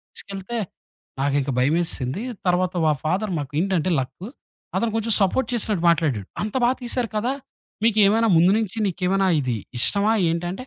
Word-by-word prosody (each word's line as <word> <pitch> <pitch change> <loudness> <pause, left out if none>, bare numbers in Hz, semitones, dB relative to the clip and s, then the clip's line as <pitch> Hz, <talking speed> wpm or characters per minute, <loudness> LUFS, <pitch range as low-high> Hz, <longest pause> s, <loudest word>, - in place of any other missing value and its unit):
తీసుకెళ్తే. 195 +4 -6 0.6
నాకింక 140 0 0
భయమేసేసింది. 145 +1 0 0.3
తర్వాత 180 0 +1
మా 155 - +4
ఫాదర్ 190 +6 -1
మాకేంటంటే 165 +6 -1
లక్కు. 135 +9 -6 0.5
అతను 230 -1 0
కొంచెం 225 0 +1
సపోర్ట్ 200 +7 +2
చేసినట్టు 210 -6 0
మాట్లాడాడు. 145 - +1
"అంత 210 0 -3
బాగా 245 +2 +3
తీశారు 240 -1 -2
కదా! 240 +5 0 0.5
మీకేమైనా 220 0 +4
ముందు 170 +3 +5
నుంచి 220 -1 -3
నీకేమైనా 190 +1 0
ఇది 125 -4 -1 0.2
ఇష్టమా" 205 - +3 0.2
ఏంటంటే? 175 +7 -3
185 Hz, 135 wpm, -23 LUFS, 155-215 Hz, 0.6 s, ముందు